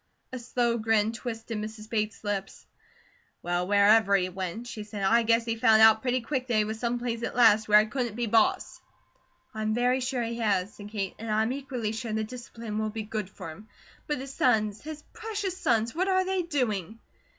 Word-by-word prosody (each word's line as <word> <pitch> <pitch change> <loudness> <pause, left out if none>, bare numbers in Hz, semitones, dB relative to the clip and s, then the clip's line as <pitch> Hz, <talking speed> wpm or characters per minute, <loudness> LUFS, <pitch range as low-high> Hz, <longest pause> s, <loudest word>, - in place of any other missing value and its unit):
A 255 - -4
slow 235 -1 0
grin 220 -1 +2
twisted 225 -1 -5
Mrs. 215 0 -7
Bates' 215 -1 -2
lips. 200 -2 -4 0.8
"Well, 175 +1 -1
wherever 205 0 +5
he 185 -1 +1
went," 190 +5 -5
she 220 -3 -7
said, 210 -1 -6
"I 230 +5 +4
guess 230 0 +2
he 230 -1 -1
found 220 -1 +5
out 220 0 +7
pretty 255 0 0
quick 255 +1 -3
that 240 - 0
he 215 - +4
was 220 +1 -5
some 240 0 -1
place 235 -1 -3
at - - -4
last 220 -3 +5
where 210 0 +7
he - - -1
couldn't 240 -1 -3
be 240 0 -1
boss." 225 0 +1 0.7
"I'm 215 0 -1
very 250 +2 +2
sure 255 -1 -2
he 230 +1 -4
has," 205 -2 0
said 205 0 -10
Kate, 200 -3 -3
"and 225 0 -6
I 215 +1 +2
am 225 - -1
equally 260 -5 -4
sure 225 0 -4
the 220 0 0
discipline 230 -2 -6
will 215 0 -1
be 220 0 -5
good 215 -2 -4
for 165 - -8
him. 210 +8 -13 0.4
But 295 - -1
his 270 +1 -7
sons! 215 -5 +1
His 305 0 -8
precious 430 -4 -4
sons! 230 -10 +1
What 370 +4 0
are 375 -1 +2
they 380 0 0
doing?" 225 - -2
225 Hz, 210 wpm, -27 LUFS, 215-245 Hz, 0.8 s, out